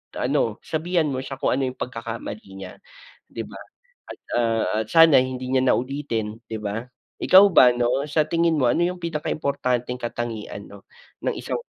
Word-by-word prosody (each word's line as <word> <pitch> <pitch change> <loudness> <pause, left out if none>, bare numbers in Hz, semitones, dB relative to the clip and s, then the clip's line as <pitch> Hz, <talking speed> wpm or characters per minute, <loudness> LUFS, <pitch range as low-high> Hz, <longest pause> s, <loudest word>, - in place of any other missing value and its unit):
ano 110 -2 0
sabihan 165 0 0
mo 130 - -2
siya 135 +1 -6
kung - - +1
ano 135 -1 0
yung 130 - -5
pagkakamali 115 -3 -6
niya, 95 - -8 0.6
'di - - -5
ba? - - -11 0.5
At, - - -10 0.2
ah, 115 -1 +1 0.2
at - - -17
sana 165 -4 +7
hindi 130 0 -3
niya 130 -1 +3
naulitin 120 -5 -1
'di 110 - -5
ba? 110 +4 -4 0.3
Ikaw 190 +2 +7
ba 125 -7 +7
ano 125 +3 0
sa 155 0 +2
tingin 165 -1 +2
mo, 125 - +3
ano 170 - +2
yung 180 +1 -2
pinaka-importanteng 140 -6 -2
katangian 115 -4 -5
'no 100 -1 -14 0.4
ng - - +1
isang - - -4
130 Hz, 170 wpm, -23 LUFS, 115-150 Hz, 0.6 s, sana